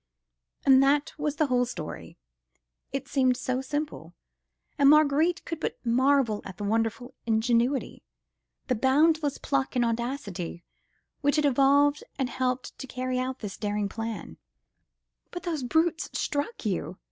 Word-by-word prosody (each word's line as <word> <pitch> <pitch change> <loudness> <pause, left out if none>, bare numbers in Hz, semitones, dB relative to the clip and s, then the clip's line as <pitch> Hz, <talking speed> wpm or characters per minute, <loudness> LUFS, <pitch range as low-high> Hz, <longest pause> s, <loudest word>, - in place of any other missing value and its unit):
And 265 -1 +7
that 290 +3 +2
was 295 0 -1
the 310 - +2
whole 250 -3 +2
story. 155 - -7 0.7
It - - -4
seemed 255 -2 +2
so 255 +1 -2
simple! 295 +3 -4 0.6
and 280 -1 +7
Marguerite 305 +3 +4
could 330 -2 -4
but - - -3
marvel 250 -2 +2
at 190 -3 -9
the - - -5
wonderful 225 +3 -1
ingenuity, 235 +4 +1 0.6
the 255 - 0
boundless 290 +4 +2
pluck 270 -2 -1
and 245 -1 +3
audacity 230 -8 -3 0.6
which 285 0 +2
had 300 -1 +2
evolved 280 +2 +4
and 260 -3 -1
helped 255 -1 -2
to 265 - -6
carry 255 0 -2
out 255 +1 -3
this 205 -3 -6
daring 210 -1 -1
plan. 225 - -6 0.9
"But 355 - -7
those 330 -5 -2
brutes 320 +6 +1
struck 290 - -3
you!" 185 -2 -2
260 Hz, 140 wpm, -27 LUFS, 230-290 Hz, 0.9 s, And